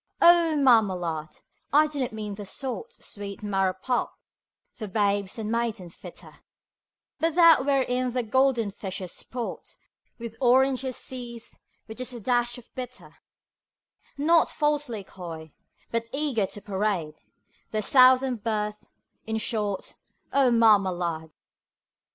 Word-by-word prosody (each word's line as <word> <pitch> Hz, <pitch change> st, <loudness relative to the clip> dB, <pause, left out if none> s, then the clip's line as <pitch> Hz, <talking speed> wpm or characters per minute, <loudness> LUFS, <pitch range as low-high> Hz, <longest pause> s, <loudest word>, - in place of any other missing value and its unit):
O 340 Hz, -2 st, +6 dB
Marmalade! 185 Hz, -, +2 dB, 0.3 s
I 300 Hz, +2 st, +6 dB
do 300 Hz, -2 st, -5 dB
not 255 Hz, -2 st, -1 dB
mean 215 Hz, -2 st, -5 dB
the 205 Hz, +1 st, -7 dB
sort, 270 Hz, -, -5 dB
Sweet 200 Hz, 0 st, -6 dB
marrow 195 Hz, -2 st, +1 dB
pulp, 245 Hz, +6 st, -1 dB, 0.6 s
for 220 Hz, -3 st, -7 dB
babes 200 Hz, 0 st, 0 dB
and 220 Hz, -1 st, -3 dB
maidens 225 Hz, -7 st, -2 dB
fitter, -, -, -12 dB, 0.8 s
But 325 Hz, -1 st, +1 dB
that 335 Hz, -6 st, +7 dB
wherein 255 Hz, -2 st, +1 dB
the 250 Hz, 0 st, -1 dB
golden 240 Hz, -2 st, +2 dB
fishes 190 Hz, -2 st, -6 dB
sport 245 Hz, -1 st, -6 dB, 0.4 s
On 235 Hz, -, -4 dB
oranges 260 Hz, 0 st, +3 dB
seas 240 Hz, -3 st, -7 dB, 0.3 s
(with 220 Hz, +2 st, -10 dB
just 255 Hz, 0 st, -4 dB
a 240 Hz, -, -7 dB
dash 240 Hz, +2 st, 0 dB
of 245 Hz, -, -15 dB
bitter), 250 Hz, -1 st, -8 dB, 1.0 s
Not 325 Hz, +3 st, +4 dB
falsely 295 Hz, -8 st, -1 dB
coy, 165 Hz, -5 st, -9 dB, 0.4 s
but 230 Hz, 0 st, -1 dB
eager 270 Hz, -8 st, +1 dB
to 205 Hz, -, -8 dB
parade 195 Hz, -6 st, -1 dB, 0.6 s
Their 215 Hz, -1 st, -2 dB
Southern 255 Hz, +1 st, +5 dB
birth 210 Hz, -1 st, -3 dB, 0.4 s
in 220 Hz, 0 st, -1 dB
short, 210 Hz, -3 st, -2 dB, 0.4 s
O 275 Hz, -2 st, +4 dB
Marmalade! 185 Hz, -8 st, +2 dB
230 Hz, 125 wpm, -26 LUFS, 200-260 Hz, 1.0 s, that